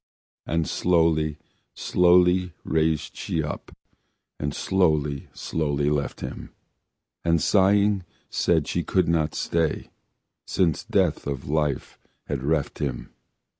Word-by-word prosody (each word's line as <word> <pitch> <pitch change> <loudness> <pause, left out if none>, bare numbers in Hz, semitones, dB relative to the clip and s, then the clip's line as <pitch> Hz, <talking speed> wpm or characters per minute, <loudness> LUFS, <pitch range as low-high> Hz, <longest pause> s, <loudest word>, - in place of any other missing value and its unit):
And 80 -1 0
slowly, 80 -3 +2 0.4
slowly 90 0 +3
raise 80 -1 0
she 80 - -2
up, 75 - -6 0.7
And 75 0 -2
slowly, 75 -5 0
slowly 75 -2 -1
left 70 -1 -2
him, - - -6 0.7
And 85 -1 +3
sighing 100 +2 +3 0.2
said 80 -3 +1
she 85 - -1
could 95 0 +1
not 80 -2 +1
stay, 80 -2 -1 0.6
Since 85 -5 +1
death - - +1
of 70 -3 -4
life 75 -2 -1 0.3
had 70 -3 -3
reft 75 +1 -1
him. 65 -4 -3
80 Hz, 110 wpm, -25 LUFS, 75-90 Hz, 0.7 s, slowly